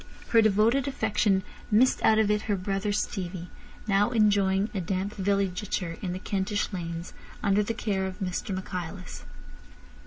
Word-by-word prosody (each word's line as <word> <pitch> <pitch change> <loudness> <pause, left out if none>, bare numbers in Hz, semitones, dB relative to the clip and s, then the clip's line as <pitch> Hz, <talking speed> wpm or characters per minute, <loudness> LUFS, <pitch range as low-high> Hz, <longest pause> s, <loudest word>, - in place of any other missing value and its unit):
Her 230 - +6
devoted 220 +6 +3
affection 210 -6 +1 0.3
missed 235 +5 +4
out 220 - +5
of 215 -1 +3
it 210 0 +1
her 205 - +3
brother 195 +2 -1
Stevie, 185 -4 -3 0.4
now 205 0 +3
enjoying 205 -2 +3
a 195 - -1
damp 190 +3 -2
villegiature 190 -3 -1
in 185 - -2
the 180 - -3
Kentish 200 +2 -2
lanes 170 -1 -5 0.3
under 200 +1 +3
the 225 +2 -2
care 190 -3 -1
of 185 -1 -7
Mr 190 +1 -3
Michaelis. 185 -1 -6
200 Hz, 150 wpm, -27 LUFS, 185-210 Hz, 0.4 s, Her